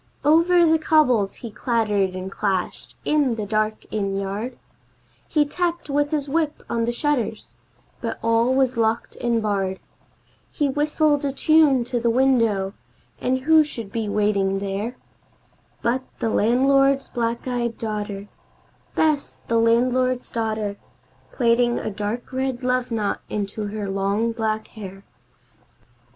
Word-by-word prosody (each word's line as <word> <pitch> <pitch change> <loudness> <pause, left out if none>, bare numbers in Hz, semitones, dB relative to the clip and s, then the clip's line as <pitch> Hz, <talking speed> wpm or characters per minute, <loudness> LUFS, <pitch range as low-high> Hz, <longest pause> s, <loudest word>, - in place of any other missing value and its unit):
Over 335 +3 +5
the 320 0 +4
cobbles 255 -11 +3
he 230 - -6
clattered 210 -4 0
and 185 +1 -5
clashed 195 -3 -2
in 290 -6 +2
the 215 -2 -3
dark 215 +1 -1
inn 200 -2 -1
yard, 205 +6 -4 0.7
He 300 -2 +2
tapped 345 0 -2
with 290 +1 +1
his 295 -2 -1
whip 310 +1 -1
on 230 -1 0
the 240 - 0
shutters, 240 -4 -2 0.5
but 230 -1 -3
all 230 +2 +3
was 260 -2 +2
locked 225 0 0
and 235 -2 0
barred, 195 -3 -1 0.7
He 290 - 0
whistled 295 +1 +1
a 280 - 0
tune 295 -3 +4
to 245 0 -2
the 235 0 +1
window, 230 -6 +2 0.5
and 260 +1 0
who 315 +3 +6
should 230 -9 -7
be 220 -1 -2
waiting 200 -2 +1
there 200 +5 -3 0.9
But 240 +2 +1 0.2
the 230 - -1
landlord's 275 +5 +3
black 235 0 -2
eyed 240 -2 -2
daughter 210 -2 -4 0.7
Bess, 305 -3 0
the 230 0 +2
landlord's 250 +2 +2
daughter 215 -3 -2 0.5
Plaiting 240 0 +2
a - - -3
dark 210 +5 -4
red 260 -1 -2
love 250 0 0
knot 215 -3 -1
into 210 0 -3
her 205 0 -4
long 200 +4 0
black 220 -1 -2
hair. 195 -3 -9
235 Hz, 140 wpm, -23 LUFS, 210-270 Hz, 0.9 s, who